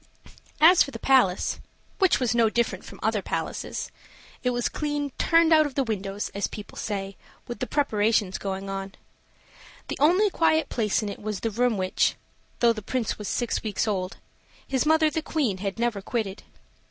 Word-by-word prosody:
As 335 +3 +7
for - - +3
the - - -7
palace 250 -9 +2 0.4
which 380 -3 +4
was 245 -4 +1
no 230 -2 +4
different 235 +1 -1
from - - -12
other - - +1
palaces - - -4 0.5
it 250 - +1
was 245 -1 0
clean 290 -2 -2
"turned 330 -1 +4
out 310 -1 +5
of 275 - -10
the 275 - +2
windows," 205 -3 -3
as 200 - -1
people 210 - -9
say, 195 -2 -4 0.3
with 240 - -6
the 255 - -2
preparations 215 -8 +1
going 195 0 -4
on. 195 0 -5 0.9
The - - -3
only 365 +8 +4
quiet 320 -2 +2
place 215 -2 0
in 210 - -3
it 200 - -8
was 210 -2 -4
the 225 - -1
room 240 0 +1
which, 185 -1 +1 0.5
though 235 -1 +5
the 215 - -7
Prince 235 +2 -2
was 210 - -5
six 240 - -1
weeks 215 0 -1
old, 185 -3 -2 0.5
his 265 +2 0
mother 315 0 +4
the 320 - -1
Queen 275 - -1
had 195 +1 -3
never 235 -4 -1
quitted. 205 -2 -3
230 Hz, 180 wpm, -26 LUFS, 200-285 Hz, 0.9 s, As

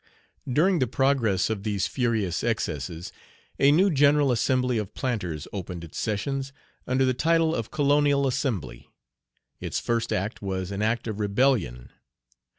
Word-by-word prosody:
During 175 +7 +3
the 130 - +1
progress 125 -7 +1
of 105 -3 -3
these 100 -2 -1
furious 110 -8 -1
excesses, 85 -7 -3 0.5
a 140 - +6
new 185 +6 +4
General 145 -1 +4
Assembly 125 0 +1
of 105 -3 -6
Planters 90 - -3
opened 90 -3 -6
its 80 - -8
sessions, 135 +5 -2 0.4
under 130 +1 +2
the 130 - +2
title 165 +4 +2
of 115 -7 -3
"Colonial 145 -1 +2
Assembly." 105 - -3 0.7
Its - - -3
first 115 -1 -1
act 100 +4 -2
was 95 -1 -3
an 100 +1 -3
act 110 +2 0
of 110 -1 -4
rebellion. 100 - 0
115 Hz, 145 wpm, -26 LUFS, 100-140 Hz, 0.7 s, a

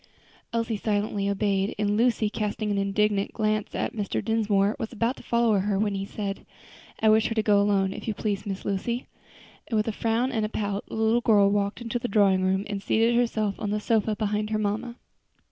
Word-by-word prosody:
Elsie 230 -1 -1
silently 205 -1 -1
obeyed, 200 -1 0
and 205 0 +1
Lucy, 230 -1 +2
casting 210 0 -2
an 200 - 0
indignant 200 0 +1
glance 215 -1 -1
at - - -2
Mr. 205 -3 -2
Dinsmore, 210 -2 +2
was 225 -3 -4
about 235 +2 0
to - - -11
follow 235 -3 +2
her, 200 +1 0
when 205 0 0
he 195 0 -3
said, 200 -2 -5 0.6
"I 220 - +4
wish 220 +1 +4
her 225 - -3
to 220 - +1
go 205 -2 +4
alone, 195 -2 +2
if - - -8
you 215 - -1
please, 205 -1 -2
Miss 195 -1 -5
Lucy;" 235 +5 -2 0.6
and 225 - -1
with 215 - +1
a - - +1
frown 230 +4 0
and 225 -4 -1
a 215 - -1
pout 205 -2 -3
the - - -7
little 220 +2 +2
girl 205 -4 +4
walked 200 +2 -1
into 235 +1 -2
the 245 - -3
drawing 200 -3 +3
room 190 +2 +1
and 200 -2 -4
seated 225 +4 +2
herself 220 -4 0
on 210 - -2
the 210 +1 0
sofa 220 0 +1
beside 210 0 -1
her 215 - 0
mamma. 215 +3 -2
210 Hz, 215 wpm, -26 LUFS, 200-225 Hz, 0.6 s, I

